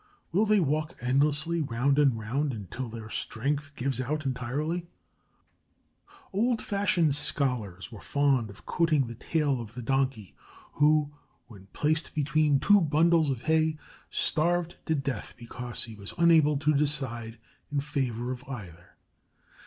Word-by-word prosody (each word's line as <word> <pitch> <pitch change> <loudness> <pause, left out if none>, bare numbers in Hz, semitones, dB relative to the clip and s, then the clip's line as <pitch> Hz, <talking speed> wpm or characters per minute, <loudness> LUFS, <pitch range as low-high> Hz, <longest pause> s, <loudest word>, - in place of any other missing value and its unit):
Will 205 +6 +2
they 210 0 +4
walk 155 0 -1
endlessly 150 +6 +1
round 135 +1 +1
and 135 -6 +4
round 130 +6 -1
until 115 +4 -6
their 110 -1 -8
strength 145 +5 -2
gives 130 -1 -1
out 150 +4 -2
entirely? 145 +7 -2 1.5
Old 230 +4 +2
fashioned 185 -7 +1
scholars 125 -10 -1
were 110 - -10
fond 140 -6 +1
of 100 +1 -14
quoting 160 -5 +2
the 120 - -7
tale 140 +1 0
of 115 0 -10
the 125 - -6
Donkey 130 -6 -1 0.4
who, 150 0 +3 0.3
when 100 -5 -14
placed 155 +2 0
between 150 -1 +2
two 205 +4 +5
bundles 160 0 +3
of 130 -3 -2
hay, 160 -1 +2 0.3
starved 175 +2 0
to 160 - +2
death 135 -2 -4
because 120 +1 -5
he 115 - -8
was 100 -2 -8
unable 160 -4 +5
to 150 +2 +2
decide 135 -6 -1 0.3
in 145 - +1
favor 130 -4 -2
of 125 0 -6
either. 90 - -9
140 Hz, 140 wpm, -28 LUFS, 120-155 Hz, 1.5 s, two